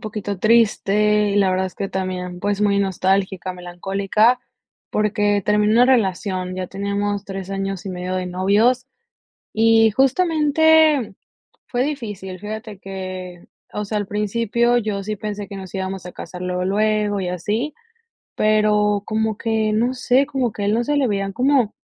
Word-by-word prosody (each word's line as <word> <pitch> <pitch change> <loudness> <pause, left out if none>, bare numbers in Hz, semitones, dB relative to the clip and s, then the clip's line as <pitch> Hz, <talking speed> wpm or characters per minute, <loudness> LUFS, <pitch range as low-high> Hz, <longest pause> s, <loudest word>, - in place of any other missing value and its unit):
poquito 210 -2 -5
triste, 210 -1 +3
y 200 - 0
la 200 -2 +4
verdad 185 0 +1
es 185 - -6
que 195 - -4
también, 180 -2 -4
pues, 205 +1 -1
muy 200 -1 +3
nostálgica, 190 -1 0
melancólica, 195 +6 +1 0.5
porque 205 -1 +1
terminé 210 +2 +2
una 240 +2 +5
relación, 190 -6 0
ya 185 0 -4
teníamos 200 +1 -2
3 195 -1 -6
años 195 -1 -4
y - - -3
medio 180 0 -4
de 185 0 -2
novios, 205 +8 +2 0.7
y 225 0 +4
justamente 305 - +3 0.5
fue 245 0 0
difícil. 205 -10 -5
Fíjate 215 0 -7
que, 185 -2 -7 0.3
o 210 - -3
sea, 210 +1 -2
al 205 - -4
principio 230 +3 +1
yo 210 -3 -3
sí 215 +2 -3
pensé 205 -1 -5
que 200 - -8
nos 190 0 -8
íbamos 190 -1 -4
a - - -8
casar 180 0 -9
luego, 180 0 -2
luego 210 +1 +1
y 180 - -3
así, 210 - -2 0.6
pero 210 -1 +2
como 220 -1 -1
que 220 -1 0
no 240 +4 +1
sé, 255 +2 +2
como 265 -5 -1
que 205 - -4
a - - 0
él 205 - +2
no 235 +1 +1
se 295 +4 0
le 270 -3 +2
veían 195 -1 -1
como, 255 -1 +2
205 Hz, 165 wpm, -21 LUFS, 190-225 Hz, 0.7 s, una